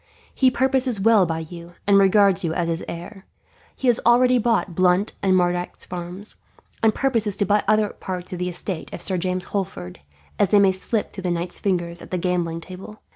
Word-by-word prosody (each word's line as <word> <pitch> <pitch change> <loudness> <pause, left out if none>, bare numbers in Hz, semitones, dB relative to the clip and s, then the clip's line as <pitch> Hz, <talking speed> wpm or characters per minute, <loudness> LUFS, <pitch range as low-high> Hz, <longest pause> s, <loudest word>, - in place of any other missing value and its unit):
He 260 - +4
purposes 260 -3 +1
well 210 -2 +4
by 165 0 -2
you, 170 +1 -11
and 200 -1 +5
regards 195 -1 +4
you 165 -1 -1
as 175 -2 0
his 165 0 -2
heir. 190 +4 -8 0.5
He - - -6
has 240 -2 +3
already 250 +1 +4
bought 225 -5 0
Blunt 185 +3 +2
and 190 -1 +3
Mardyke's 175 0 -1
farms, 180 +3 -6 0.4
and 220 -1 +3
purposes 225 -7 0
to 200 - +1
buy 205 +2 +2
other 215 0 +3
parts 180 -1 -6
of 180 - -5
the 180 0 -1
estates 175 -1 -5
of 175 - -5
Sir 185 -2 0
James 185 +1 -2
Holford, 185 - -4 0.4
as 205 - +3
they 205 - +5
may 195 -1 +5
slip 205 +3 -3
through 195 - -7
the 180 - -2
knight's 175 +1 -3
fingers 175 -3 -1
at - - -11
the 185 - -2
gambling 170 -2 -1
table. 190 +4 -11
190 Hz, 200 wpm, -22 LUFS, 175-210 Hz, 0.5 s, and